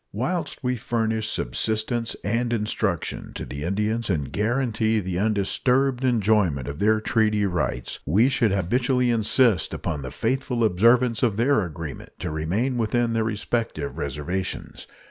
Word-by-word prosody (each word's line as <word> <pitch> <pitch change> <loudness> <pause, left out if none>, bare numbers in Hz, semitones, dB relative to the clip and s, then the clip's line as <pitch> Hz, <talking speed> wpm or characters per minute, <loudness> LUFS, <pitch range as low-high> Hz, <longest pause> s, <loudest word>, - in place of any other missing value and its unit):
Whilst 150 - -3
we 125 0 0
furnish 110 -1 -1
subsistence 110 - -1
and 115 +3 0
instruction 105 -5 -2
to - - -5
the 70 +2 -7
Indians 105 +7 -1
and 75 -8 -1
guarantee 110 -1 +1
the 90 -2 -3
undisturbed 125 +6 +1
enjoyment 105 - +2
of 70 +2 -6
their 110 +1 +3
treaty 110 -2 +1
rights, 90 -9 -2
we 105 - +4
should 120 -5 +2
habitually 125 +6 +1
insist 115 -2 +2
upon 75 - -3
the 65 - -5
faithful 125 - -1
observance 115 +4 +3
of 115 -5 +1
their 125 0 +3
agreement 80 -3 -7
to - - -4
remain 100 +12 -1
within 115 +1 +1
their 115 -1 +1
respective 115 +5 -2
reservations. 75 +7 -4
110 Hz, 140 wpm, -24 LUFS, 95-120 Hz, -, we